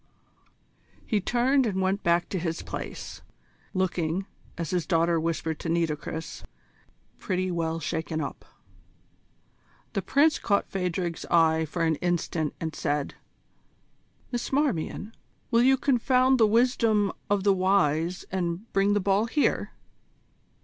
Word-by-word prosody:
He 210 -3 0
turned 250 +5 +2
and 190 -3 -1
went 190 +2 0
back 170 0 +2
to 190 - -2
his 165 -1 -3
place, - - -7 0.5
looking, 185 -1 -1 0.3
as 170 -3 -3
his 175 -3 -1
daughter 170 -1 +2
whispered 160 -1 -2
to 165 - -4
Nitocris, 160 -1 -2 0.8
"pretty 185 -1 -1
well 165 -1 -1
shaken 160 +1 -3
up." 140 - -5 1.5
The - - 0
Prince 305 +2 +3
caught 200 -2 +1
Phadrig's 180 -2 -2
eye 160 -1 +3
for 165 +3 -3
an 160 -2 +2
instant, 170 -3 -1
and 160 -1 -3
said: 145 -1 -1 1.2
"Miss 240 -1 -3
Marmion, 235 - -1 0.4
will 230 - +5
you 265 +2 +5
confound 255 -1 +3
the 220 - +6
wisdom 225 -3 +3 0.2
of 200 -1 +1
the 200 -1 +4
wise 185 -3 +1
and 180 +3 -3
bring 200 +1 +3
the 205 - +2
ball 200 +2 +2
here?" 290 +5 +1
185 Hz, 130 wpm, -27 LUFS, 165-215 Hz, 1.5 s, the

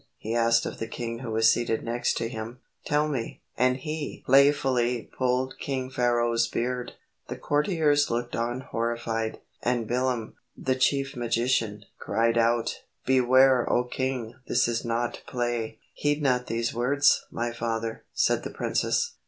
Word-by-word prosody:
he 110 - -4
asked 115 0 +3
of - - -5
the 115 - -3
king 115 0 -5
who 125 -2 -6
was 110 0 +4
seated 115 -2 -1
next 120 +1 -1
to 115 - -1
him. 115 +1 -7 0.3
"Tell 150 +1 +2
me," 130 -6 -4 0.2
and 125 +1 +2
he 155 +1 -5
playfully 130 -3 +3
pulled 130 +1 0
King 130 -2 -3
Pharaoh's 120 -2 +2
beard. 125 +1 -3 0.3
The - - -4
courtiers 150 -1 +2
looked 120 +1 -2
on 120 +2 -2
horrified, 115 -2 -2 0.2
and 120 -2 0
Bilam, 125 -2 -1 0.2
the 130 - 0
chief 135 +1 +1
magician, 115 -3 0
cried 115 +2 +1
out, 115 0 +1 0.2
"Beware, 130 0 +4
O 120 - +3
king, 125 -2 -3
this 120 - +2
is 115 -1 -1
not 115 +1 -2
play." 120 -3 -2 0.2
"Heed 145 0 0
not 125 -2 +2
these 115 +1 -1
words, 140 +4 +3
my 120 0 -2
father," 115 -1 -3
said - - +2
the - - -4
princess. 475 0 0
120 Hz, 150 wpm, -27 LUFS, 115-130 Hz, 0.3 s, was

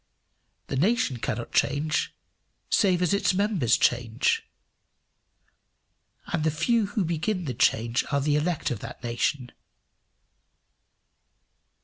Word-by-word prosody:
The - - -4
nation 200 - +1
cannot 115 0 -4
change 155 +3 0 0.6
save 180 -3 +3
as 180 - +2
its 200 -1 +2
members 195 - +2
change; 120 -2 +1 1.9
and 165 -3 0
the 160 - +3
few 205 +8 +1
who 205 -2 -1
begin 170 +3 -2
the 130 - -3
change 115 +1 +1
are 140 - +2
the 145 +1 +1
elect 155 -1 -1
of 120 - -3
that 120 +3 -9
nation. 120 +2 -1
155 Hz, 110 wpm, -26 LUFS, 125-185 Hz, 1.9 s, save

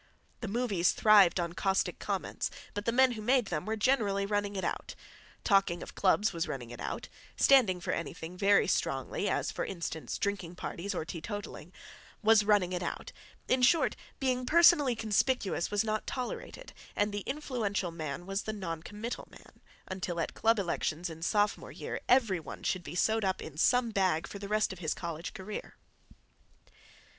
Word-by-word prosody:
The 225 - -5
movies 200 -5 +1
thrived 200 -5 +6
on 170 -1 -2
caustic 190 +2 0
comments, - - -2 0.2
but 205 0 -4
the 230 - +2
men 260 +2 +5
who 220 -3 -5
made 245 +2 +3
them - - -2
were 220 - 0
generally 210 -4 +2
running 205 0 -1
it 190 - -2
out; - - -3 0.5
talking 195 -5 +2
of - - -10
clubs 200 +2 +2
was 165 0 -2
running 120 -3 -5
it 120 - -9
out; - - -4 0.3
standing 230 -10 +5
for - - -3
anything 170 +1 -5
very 200 +2 +4
strongly, - - -1
as, - - 0
for - - -3
instance, 170 -3 -4
drinking 195 -4 -2
parties 190 +2 -4
or 160 - -2
teetotalling, 205 +6 -6 0.5
was 220 0 +6
running 205 -4 +3
it 180 - -2
out; 175 - -4 0.4
in 255 0 +2
short, 315 +7 +4 0.2
being 255 -2 0
personally 320 -6 +6
conspicuous 220 -3 0
was 205 +1 +1
not 215 -1 -2
tolerated, 260 - -5 0.2
and 205 0 +1
the 205 - -2
influential 235 - -2
man 160 +1 -5
was 195 +1 -2
the 215 - -4
non 170 -6 -4
committal 210 +7 -6
man, - - -17 0.3
until 185 -2 -3
at 165 - -2
club 225 0 +3
elections 175 -2 -2
in 160 0 -10
sophomore 205 +4 0
year - - -5
every 230 -8 +4
one 160 - -9
should 185 - 0
be 160 +2 -7
sewed 220 +4 +2
up 190 -1 0
in 155 - -8
some 240 +8 +3
bag 185 -5 +1
for 200 - -8
the 200 - -6
rest 215 -1 +1
of 185 - -12
his 160 -4 -1
college 170 -1 -5
career. 200 +2 -7
200 Hz, 175 wpm, -31 LUFS, 175-225 Hz, 0.5 s, thrived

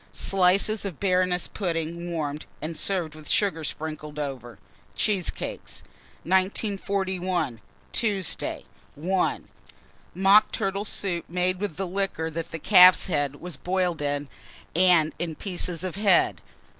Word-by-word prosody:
Slices 195 +3 +2
of 190 -7 -5
Baroness 180 -2 +1
pudding 170 -2 -3
warmed, 150 -2 -3
and 160 +2 -5
served 175 -3 -1
with 155 -1 -10
sugar 185 -6 +1
sprinkled 150 0 -6
over. 130 -7 -5 0.4
Cheesecakes. 195 - -2 0.4
1941. 190 - 0 0.3
Tuesday. 200 -7 -1 0.3
1. 180 +5 -1 0.7
Mock 195 +3 +5
turtle 195 +1 -2
soup, 185 -4 -2
made 180 +1 0
with 195 -5 -4
liquor 190 -3 -2
that 165 +1 -4
calf's 185 -3 +8
head 145 -6 0
was 170 -1 -7
boiled 180 -3 -1
in, 145 0 -1 0.5
and 175 -3 +5
the 165 -2 -3
pieces 180 -2 -2
of 185 0 -4
head. 200 -3 +3
180 Hz, 115 wpm, -26 LUFS, 160-195 Hz, 0.7 s, calf's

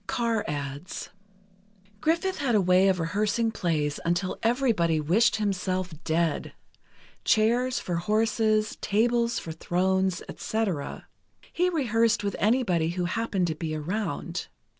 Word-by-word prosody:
Carr 230 +1 0
adds: 145 +3 -5 0.9
Griffith 335 - 0
had 260 -5 +1
a - - +5
way 185 +1 +4
of 190 -2 +2
rehearsing 210 +7 0
plays 155 -8 -1
until 175 +3 -1
everybody 225 - +2
wished 180 +10 +3
himself 185 -3 -1
dead—chairs 215 - -1
for 175 -2 -3
horses—tables 220 +3 +1
for 165 - -5
thrones, 185 +2 0
etc. 195 -10 -3 0.5
He 360 +1 +2
rehearsed 230 -9 +1
with 200 -1 -1
anybody 205 -8 +2
who 175 +1 -2
happened 205 -1 0
to 165 - -1
be 155 0 -4
around. 175 +1 -3
200 Hz, 115 wpm, -27 LUFS, 170-225 Hz, 0.9 s, a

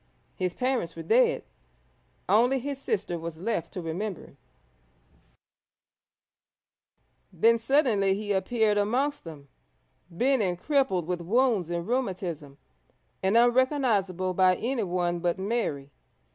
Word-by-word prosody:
His 180 -1 -2
parents 250 -10 -1
were 165 - -7
dead; 485 +1 +3 0.8
only 245 +5 +3
his 275 +1 -5
sister 175 -7 -2
was 165 -1 -6
left 180 -2 -3
to 180 - -5
remember 180 +4 -4
him. - - -19 2.9
Then 230 +7 +3
suddenly 225 -7 +2
he 205 0 -4
appeared 210 +1 +1
amongst 255 +7 -1
them, 150 -4 -10 0.6
bent 250 +9 +1
and 180 -3 0
crippled 265 - +1
with 175 0 -3
wounds 215 -1 +1
and 170 0 -3
rheumatism, 180 - -3 0.6
and 190 +4 +2
unrecognisable 235 - +2
by 185 0 +4
anyone 180 -8 -1
but 175 +1 -1
Mary. 190 -9 -2
200 Hz, 115 wpm, -27 LUFS, 175-245 Hz, 2.9 s, by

